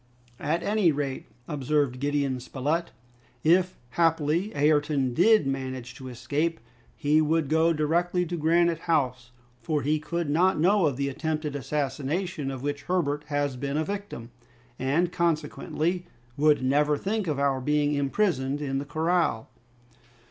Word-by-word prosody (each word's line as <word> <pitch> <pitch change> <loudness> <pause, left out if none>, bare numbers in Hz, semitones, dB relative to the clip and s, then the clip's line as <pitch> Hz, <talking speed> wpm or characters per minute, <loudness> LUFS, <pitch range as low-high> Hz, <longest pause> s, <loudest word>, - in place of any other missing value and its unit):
"At 165 +4 -1
any 205 -4 +3
rate," 140 -2 -3 0.2
observed 145 -2 0
Gideon 140 -2 0
Spilett, 150 +7 -2 0.5
"if 180 +3 +3
happily 165 - +1
Ayrton 145 -3 +2
did 215 - +5
manage 130 -2 -4
to 130 - -10
escape, 145 +7 -2 0.4
he 150 +2 +3
would 155 -1 +1
go 160 +2 +3
directly 170 +3 +1
to 175 +1 -4
Granite 170 +1 +2
House, 125 -6 +1 0.3
for 150 +5 -1
he 150 +2 +1
could 170 +2 -3
not 175 +4 +2
know 185 +1 +4
of 135 -4 -2
the 140 0 -1
attempted 155 +1 -3
assassination 145 - -2
of 135 -1 -6
which 145 0 -2
Herbert 150 -5 0
has 145 -2 -1
been 140 +2 -2
a 155 - 0
victim, 200 - -6 0.5
and 155 +7 +1
consequently 170 +1 -1 0.3
would 150 -1 +3
never 145 +3 +2
think 205 +3 -2
of 150 -3 -1
our 140 -2 +1
being 150 +2 +1
imprisoned 140 -1 0
in 135 -2 -2
the 140 - -5
corral." 160 -5 0
150 Hz, 140 wpm, -27 LUFS, 140-170 Hz, 0.5 s, did